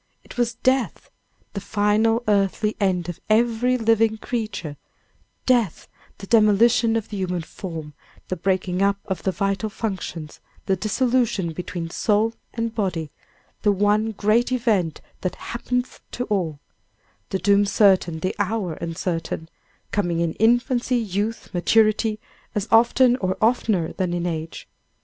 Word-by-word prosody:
It - - -13
was 240 -1 0
death 260 0 0 0.4
the 200 - -4
final 215 +3 +2
earthly 210 +1 +1
end 185 -4 +1
of 175 - -6
every 235 +3 +3
living 225 -1 +2
creature 215 -10 -4 0.7
death, 240 -9 +1 0.3
the 195 - -9
demolition 225 +2 +4
of 225 -2 -2
the 210 - -5
human 180 -3 -2
form, 160 -3 -7 0.3
the 185 - -2
breaking 185 0 -1
up 200 0 +3
of 190 - -3
the 190 - 0
vital 195 +3 -1
functions, 190 -7 -5 0.3
the 190 - +2
dissolution 220 -2 0
between 170 0 -5
soul 215 +4 +1 0.2
and 230 -1 -3
body, 180 -8 -2 0.5
the 205 - +3
one 210 +2 +2
great 215 +5 +2
event 215 - 0 0.2
that 185 - -2
"happeneth 250 +1 -3
to 245 - -2
all;" 180 -10 -2 0.7
the 190 - 0
doom 200 +2 +4
certain, 190 -6 +3
the 185 - -1
hour 205 -3 -1
uncertain; 165 0 -4 0.4
coming 175 -5 0
in 170 -1 0
infancy, 245 +2 +2
youth, 215 0 -3
maturity, 215 +3 +2 0.4
as 210 +1 -1
often 240 +2 +5
or 185 -5 -1
oftener 215 -7 +1
than 180 -2 -1
in 175 0 -2
age. 165 -1 -4
205 Hz, 135 wpm, -23 LUFS, 180-225 Hz, 0.7 s, often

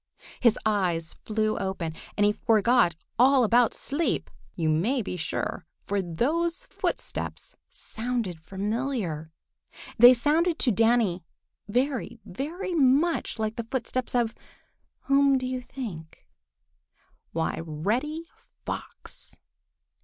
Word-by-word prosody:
His 235 -3 +4
eyes 180 -6 0
flew 215 0 -1
open, 190 -4 -3 0.2
and 205 - +4
he 205 - +5
forgot 225 -4 +3 0.2
all 260 +1 +6
about 235 +1 +4
sleep, 300 +4 -1 0.2
you 165 -2 -1
may 210 - +2
be 190 - -4
sure, 160 -3 -3 0.2
for 200 0 0
those 330 - -1
footsteps - - -3
sounded 225 -7 -3
familiar. 195 - -3 0.7
They 245 +2 +10
sounded 315 +7 +2
to 255 - +2
Danny 225 -4 +2 0.4
very, 245 0 -1
very 300 - -4
much 295 +2 +2
like 220 0 -2
the 230 -1 -4
footsteps 255 -1 -2
of—whom 275 +3 0
do 255 - -3
you 255 0 -2
think? 215 -11 -8 1.1
Why, 165 0 -1
Reddy 230 - -2 0.4
Fox! - - -6
235 Hz, 110 wpm, -27 LUFS, 190-265 Hz, 1.1 s, They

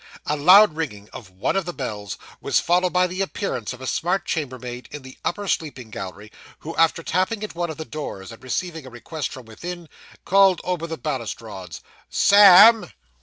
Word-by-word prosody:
A 150 - 0
loud 180 +4 +6
ringing 105 -11 -5
of 105 -7 -10
one 95 - -2
of 195 -2 0
the 175 - -5
bells 105 -7 -5 0.2
was - - +2
followed 180 +1 +1
by 180 0 +3
the 180 +2 -4
appearance 190 - -3
of 125 0 -10
a - - -6
smart 175 +7 -1
chambermaid 125 -5 -5
in 150 -2 -9
the 130 0 -12
upper 205 +3 -3
sleeping 130 - -3
gallery, 100 +2 -8 0.3
who, 165 +2 -7
after 165 0 +2
tapping 190 +6 -1
at 215 - -6
one 175 0 -3
of 160 - -7
the 160 - -6
doors, 115 -11 -7
and 115 - -13
receiving 160 +2 -4
a - - -9
request 130 +6 -6
from 130 -2 -10
within, 170 +10 -8 0.4
called 195 -2 +4
over 175 -2 -3
the 160 -1 -5
balustrades 115 - -6 0.3
'Sam! 205 +3 +7
160 Hz, 185 wpm, -22 LUFS, 120-180 Hz, 0.4 s, Sam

